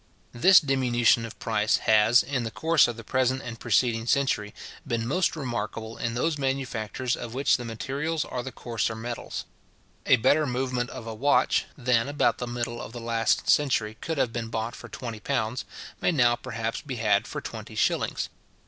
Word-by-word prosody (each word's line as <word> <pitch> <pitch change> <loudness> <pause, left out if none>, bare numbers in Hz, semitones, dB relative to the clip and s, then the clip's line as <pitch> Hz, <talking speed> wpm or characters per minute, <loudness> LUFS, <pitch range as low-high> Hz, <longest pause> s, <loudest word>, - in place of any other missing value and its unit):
This 185 +10 +7
diminution 125 -5 +2
of 115 - -12
price 110 -1 +1
has, 110 +2 +5
in 135 -3 -2
the 115 - -3
course 160 +9 +3
of 120 -1 -5
the 115 - -8
present 130 +3 0
and 115 -1 -7
preceding 115 0 +1
century, 125 -7 +1 0.4
been 115 -1 -1
most 180 +7 +1
remarkable 115 -5 -4
in 115 0 -3
those 150 +4 0
manufactures 130 -2 -2
of 120 0 -7
which 135 +2 +3
the 120 - -7
materials 140 +8 -2
are 125 - -4
the 130 +1 -6
coarser 115 -2 -2
metals. 120 +1 -5 0.6
A - - +7
better 145 +6 +3
movement 125 -1 -1
of 115 - -8
a 115 - -5
watch, 140 +6 +2
than 125 -1 +1
about 145 - +1
the 125 - -3
middle 120 0 -4
of - - -8
the 120 - -6
last 115 -1 0
century 115 -7 +2
could 160 -2 -3
have 125 -4 +1
been 115 -2 -3
bought 115 +1 -3
for - - -11
twenty 115 -3 -6
pounds, 125 0 -2 0.4
may - - +3
now 120 -6 +4
perhaps 115 -2 -4
be 135 -3 -6
had 110 -2 +2
for - - -4
twenty - - -8
shillings. - - 0
120 Hz, 185 wpm, -26 LUFS, 115-135 Hz, 0.6 s, This